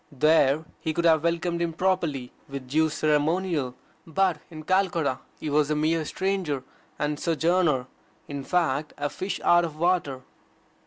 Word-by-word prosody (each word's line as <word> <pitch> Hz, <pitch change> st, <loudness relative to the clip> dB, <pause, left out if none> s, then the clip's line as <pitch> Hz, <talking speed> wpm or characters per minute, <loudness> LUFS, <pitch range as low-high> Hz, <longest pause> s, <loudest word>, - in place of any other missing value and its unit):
There 150 Hz, +1 st, +3 dB
he 160 Hz, -1 st, -3 dB
could 170 Hz, -, 0 dB
have 160 Hz, -2 st, +5 dB
welcomed 170 Hz, 0 st, 0 dB
him 170 Hz, -1 st, -1 dB
properly 165 Hz, -8 st, -1 dB, 0.2 s
with 135 Hz, -2 st, -6 dB
due 155 Hz, +4 st, +2 dB
ceremonial. 155 Hz, -2 st, 0 dB, 0.3 s
But 180 Hz, 0 st, +1 dB
in 155 Hz, -2 st, -9 dB
Calcutta 170 Hz, -7 st, +1 dB, 0.2 s
he -, -, -5 dB
was 150 Hz, 0 st, +2 dB
a 150 Hz, -, +1 dB
mere 155 Hz, +1 st, +1 dB
stranger 185 Hz, -7 st, -1 dB, 0.3 s
and 150 Hz, 0 st, -1 dB
sojourner 165 Hz, -4 st, +2 dB, 0.4 s
in 140 Hz, -1 st, -5 dB
fact 155 Hz, -3 st, 0 dB
a 145 Hz, 0 st, -2 dB
fish 190 Hz, +2 st, -4 dB
out 175 Hz, 0 st, +5 dB
of 160 Hz, -3 st, -4 dB
water. 165 Hz, -6 st, +1 dB
155 Hz, 150 wpm, -26 LUFS, 145-175 Hz, 0.4 s, have